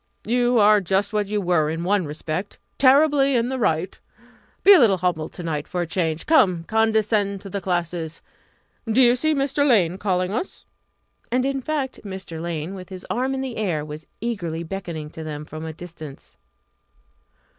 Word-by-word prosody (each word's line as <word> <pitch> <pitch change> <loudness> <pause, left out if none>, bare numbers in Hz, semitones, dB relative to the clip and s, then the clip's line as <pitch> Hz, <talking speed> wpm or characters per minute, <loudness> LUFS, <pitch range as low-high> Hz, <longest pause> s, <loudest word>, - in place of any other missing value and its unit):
"You 245 +1 +2
are 210 -1 +6
just 195 +3 0
what 210 -1 0
you 210 +1 -1
were 175 -5 +1
in 165 +2 -3
one 195 0 +1
respect 155 +5 -5 0.2
terribly 275 0 +5
in 235 0 +1
the 260 0 -3
right! 175 -4 0 0.6
Be 400 - +9
a 380 - +7
little 215 -7 +5
humble 175 -3 -1
to 175 - -9
night 150 -3 -3
for 180 - -2
a - - -1
change. 165 -2 -2
Come, 185 - +4
condescend 215 -1 +1
to 195 - -9
the 200 - -3
classes! 175 -2 -3 0.7
Do 230 - +3
you 245 -1 +6
see 310 +4 +1
Mr. 280 +1 +1
Lane 195 - +3
calling 185 -2 0
us?" 355 - -4 0.7
And, 250 +1 +1
in 275 0 -1
fact, 275 -2 -3
Mr. 190 -5 -7
Lane, 170 +1 -4
with 185 -1 -9
his 185 -1 -8
arm 260 +2 0
in 265 - -3
the 260 -3 -5
air, 175 -9 -1
was 155 +1 -9
eagerly 175 -8 -3
beckoning 165 -4 -6
to 160 - -8
them 150 -1 -6
from 155 +1 -8
the 160 - -4
distance. 155 -4 -11
195 Hz, 180 wpm, -23 LUFS, 165-240 Hz, 0.7 s, Be